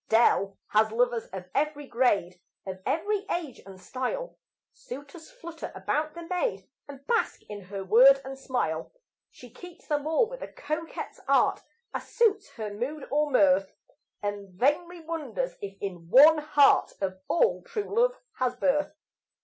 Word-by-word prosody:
Dell 200 -4 +3
has 215 +1 +3
lovers 240 0 +1
of 190 -1 -8
every 290 0 -1
grade, 200 -9 +1 0.2
Of 190 -1 -6
every 400 +5 0
age 320 -7 -3
and 190 -1 -11
style; 265 - -4 0.4
Suitors 285 +5 -10
flutter 340 -11 -8
about 295 - -2
the 340 - -7
maid, 365 +7 -2 0.2
And 280 -1 -11
bask 465 -1 0
in 205 -2 -8
her 195 +1 -6
word 250 +8 +7
and 270 0 -6
smile. 245 - -2 0.4
She 245 -2 -15
keeps 355 +4 -13
them 295 0 -1
all, 320 +9 +3
with - - -9
a - - -5
coquette's 320 +2 -5
art, - - +3 0.3
As - - -5
suits 430 -4 +2
her 215 -3 -5
mood 265 +7 -4
or 300 +1 +2
mirth, 195 -6 +3 0.5
And 205 -1 -4
vainly 340 +6 +1
wonders 330 - -4
if 195 -1 -7
in 175 -4 -6
one 305 - +8
heart 295 -2 +4
Of 185 -1 -3
all 465 +7 +2
true 435 -4 -5
love - - +3 0.2
has 250 -1 0
birth. 295 +2 0
275 Hz, 155 wpm, -27 LUFS, 205-330 Hz, 0.5 s, one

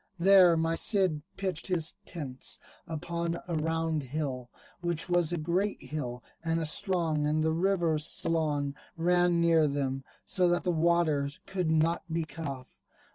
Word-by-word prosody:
There 180 -1 +6
my 165 0 +1
Cid 185 -4 +2 0.2
pitched 190 -4 -3
his 170 -4 +1
tents 135 -7 -3 0.3
upon 170 +1 -3
a 175 - -3
round 160 0 -1
hill, 130 -3 -4 0.3
which 175 -2 +1
was 175 -2 +2
a 175 - -1
great 175 +6 -1
hill 125 -5 -5 0.2
and 165 0 0
a 165 - -2
strong; 160 -2 +2
and 155 +1 +1
the 160 0 +1
river 170 -3 +1
Salon 150 -2 0 0.2
ran 175 0 +3
near 165 -2 +4
them, 135 -2 -2 0.2
so 180 -1 +2
that 175 0 +1
the 180 - +1
water 160 -4 +2 0.2
could 185 -4 -2
not 160 +2 +2
be 165 0 0
cut 160 0 -7
off. 130 -2 -8
165 Hz, 155 wpm, -29 LUFS, 150-175 Hz, 0.3 s, There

